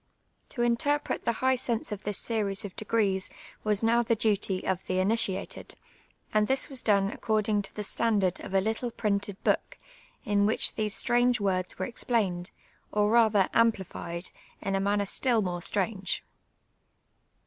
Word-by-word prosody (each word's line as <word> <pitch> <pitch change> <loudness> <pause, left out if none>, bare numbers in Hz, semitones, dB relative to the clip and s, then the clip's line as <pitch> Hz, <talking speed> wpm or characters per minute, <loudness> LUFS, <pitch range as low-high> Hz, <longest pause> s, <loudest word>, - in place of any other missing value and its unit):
To 240 - -2
interpret 265 +5 0
the - - +3
hij^li 260 -1 +3
sense 235 -4 -2
of 210 -1 -5
this 205 -1 +1
scries 210 -3 -1
of 195 - -8
defaces 205 -3 0 0.3
was 210 0 +2
now 230 +1 +4
tlic 230 -1 0
duty 205 -3 +1
of 190 -1 -1
tlie 185 0 -1
initiated, 195 -1 -1 0.6
and 215 0 +3
this 265 0 +2
was 265 -2 -1
done 200 -2 +2
accordinfij 215 -2 0
to - - -8
tlic 210 - -4
standard 200 -5 +1
of 195 - -6
a 190 - +4
little 220 +4 -2
])rinted 205 -3 -1
book, - - 0 0.5
in 205 0 +2
which, 220 - +3
these 215 -1 0
Htninj^c 245 0 +3
words 185 -2 -1
were - - -2
explained, 205 -7 -1 0.4
or 210 0 +2
rather 220 -4 +4
amj)lified, 190 -6 0 0.3
in 195 - -3
a 195 - +1
manncn 200 0 +1
still 235 0 +2
more 175 -1 -3
stranpc. 195 0 -1
210 Hz, 160 wpm, -28 LUFS, 195-230 Hz, 0.6 s, now